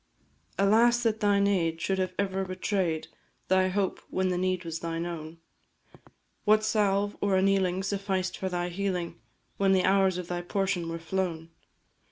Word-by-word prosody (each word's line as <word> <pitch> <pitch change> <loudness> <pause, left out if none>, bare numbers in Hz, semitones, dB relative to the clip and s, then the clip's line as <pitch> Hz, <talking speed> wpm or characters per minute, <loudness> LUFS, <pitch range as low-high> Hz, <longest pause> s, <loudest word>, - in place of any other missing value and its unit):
Alas, 230 +4 +4
that 220 -2 +1
thine 200 -1 +3
aid 165 -5 +1
should 190 +3 -1
have 185 -1 -2
ever 195 -1 -1
betray'd 185 -3 -1 0.4
Thy 185 0 +4
hope 190 +1 -1
when 185 0 0
the 180 - 0
need 185 -1 -1
was 165 -1 -4
thine 165 0 -3
own; 165 -1 -6 1.1
What 215 +1 +4
salve 205 -2 +1
or 200 -1 +2
annealing 190 -1 +2
sufficed 195 -2 -2
for 190 - -3
thy 175 -1 -2
healing 180 -5 -3 0.4
When 195 -1 +3
the 185 -1 +3
hours 190 -1 +3
of 180 -1 -5
thy 175 0 -3
portion 180 -2 -1
were 165 - -3
flown? 165 -1 -3
190 Hz, 160 wpm, -28 LUFS, 175-200 Hz, 1.1 s, Alas